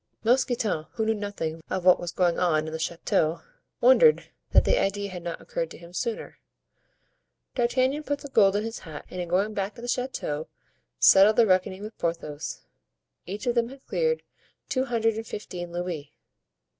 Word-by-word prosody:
Mousqueton, 230 - +1
who 220 - -1
knew 220 - +2
nothing 200 -6 -4
of 185 -1 -2
what 180 - +7
was 175 -1 -4
going 175 -1 +1
on 155 -4 +2
in 155 - -6
the 160 - -4
chateau, 160 0 0 0.4
wondered - - +5 0.2
that - - +5
the - - +3
idea 200 0 -1
had 180 -1 -6
not 170 -1 -5
occurred 165 - -3
to - - -11
him 170 +1 -14
sooner. 230 +4 -4 1.1
D'Artagnan 255 +4 +1
put 285 -1 -2
the - - -7
gold 200 -6 +4
in 210 - +1
his 225 +1 -5
hat, 155 -3 -9
and 180 - -4
in 175 - -4
going 195 +5 +1
back 200 0 -3
to 235 - -11
the - - -5
chateau 245 - -2 0.5
settled 195 - +7
the 235 - +6
reckoning 185 0 +1
with 215 +2 -9
Porthos, 155 -3 -3 0.7
each 200 +3 -5
of 240 - +2
them 235 -1 +1
had 270 +1 -13
cleared 475 -1 0 0.5
two 260 0 +1
hundred 225 -3 +1
and 225 0 -5
fifteen 175 -4 -6
louis. 170 -4 -4
200 Hz, 180 wpm, -26 LUFS, 170-235 Hz, 1.1 s, what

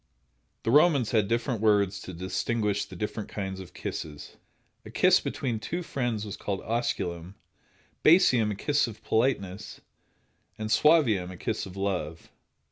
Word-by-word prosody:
The 115 - 0
Romans 145 -4 +4
had 110 -4 +2
different 115 0 -1
words 100 -2 +3
to 95 - -8
distinguish 100 +4 -1
the 95 - -11
different 105 +3 -4
kinds 95 -2 -5
of 95 - -11
kisses. 75 -2 -6 0.5
A - - -11
kiss - - +4
between 120 -5 -3
two 175 +11 -4
friends 120 -8 -2
was 105 -1 -6
called 100 -2 -3
osculum; 95 -6 -2 0.7
basium, 130 - +5
a 105 - -2
kiss 145 +6 +1
of 110 -1 -10
politeness; 110 -4 -1 0.8
and 110 0 -4
suavium, 120 - +4
a 95 - -9
kiss - - -3
of 95 +1 -11
love. 90 -5 -3
105 Hz, 145 wpm, -27 LUFS, 95-120 Hz, 0.8 s, basium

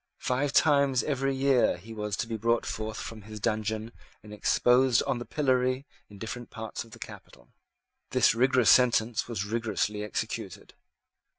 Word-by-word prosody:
Five 135 +3 0
times 140 -4 +3
every 135 -2 -1
year 135 -7 +3
he 110 +6 -11
was 105 -1 -3
to 115 - -2
be 115 - -3
brought 115 +2 +1
forth 110 0 -4
from 110 -1 -7
his 105 +1 -9
dungeon 110 +1 -2 0.3
and 105 0 -11
exposed 125 +4 +3
on 135 -3 -1
the 120 - -6
pillory 130 -2 0 0.2
in 100 - -13
different 115 +3 -7
parts 110 0 -6
of 115 - -18
the - - -12
capital. - - -12 0.6
This - - +4
rigorous 125 0 +4
sentence 120 -2 +3
was 110 -5 -3
rigorously 105 -2 -2
executed. 105 - -5
115 Hz, 160 wpm, -28 LUFS, 110-130 Hz, 0.6 s, This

